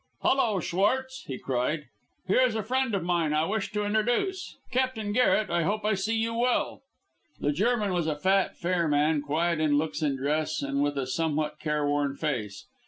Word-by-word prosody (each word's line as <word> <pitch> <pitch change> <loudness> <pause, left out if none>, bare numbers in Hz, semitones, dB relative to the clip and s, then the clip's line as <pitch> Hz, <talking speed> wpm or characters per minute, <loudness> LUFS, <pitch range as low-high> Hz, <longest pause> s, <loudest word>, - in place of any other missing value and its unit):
"Hullo! 235 -7 +2
Schwartz," 255 +10 0
he 130 - -4
cried. 135 +4 -1 0.4
"Here 200 +7 +4
is 250 -3 +2
a 220 - -1
friend 255 0 0
of 190 - -1
mine 170 -3 +1
I 155 +1 +2
wish 210 +1 -2
to 210 0 -1
introduce. 245 - 0
Captain 250 -5 0
Garret, 215 -4 +3
I 170 0 +2
hope 210 +5 -1
I 215 - +3
see 195 +4 -1
you 225 +1 0
well?" 245 +3 0 0.6
The 145 - +1
German 210 +4 +1
was 175 -3 0
a 155 - 0
fat, 190 +6 +1
fair 175 -1 0
man, 150 +1 +2
quiet 160 +3 0
in 150 -2 +3
looks 155 +1 -2
and 145 -3 0
dress, 150 +3 -1
and 140 0 -1
with 145 0 0
a 135 - -1
somewhat 150 +2 -1
careworn 145 -2 0
face. 120 -10 -3
170 Hz, 185 wpm, -27 LUFS, 150-215 Hz, 0.6 s, Here